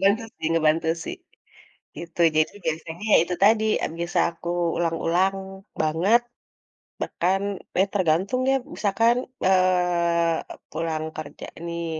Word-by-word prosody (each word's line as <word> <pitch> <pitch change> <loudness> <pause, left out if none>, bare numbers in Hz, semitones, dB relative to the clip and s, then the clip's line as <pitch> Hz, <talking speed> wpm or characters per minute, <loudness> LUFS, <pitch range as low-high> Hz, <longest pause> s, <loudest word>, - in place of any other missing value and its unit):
Ngebantu 200 +4 +3 0.2
sih - - -3
ngebantu 160 0 +2 0.2
sih, - - -5 0.8
gitu. 170 0 -9 0.2
Jadi 155 0 +3
biasanya 160 +3 -4
ya - - +8
itu 180 +1 -3
tadi 215 +1 +5 0.4
bisa 170 +1 -1
aku 170 +1 -7 0.3
ulang-ulang 175 +3 +1 0.5
banget, 170 +10 +3 0.8
bahkan 190 +3 0 0.4
ya 190 - +5
tergantung 190 +5 +1
ya - - +4 0.2
misalkan, 230 +3 +2 0.3
eee, 180 -3 +3 0.4
pulang 160 -1 -2
kerja 155 -2 -7 0.2
nih, 170 0 -4
170 Hz, 115 wpm, -24 LUFS, 165-195 Hz, 0.8 s, ya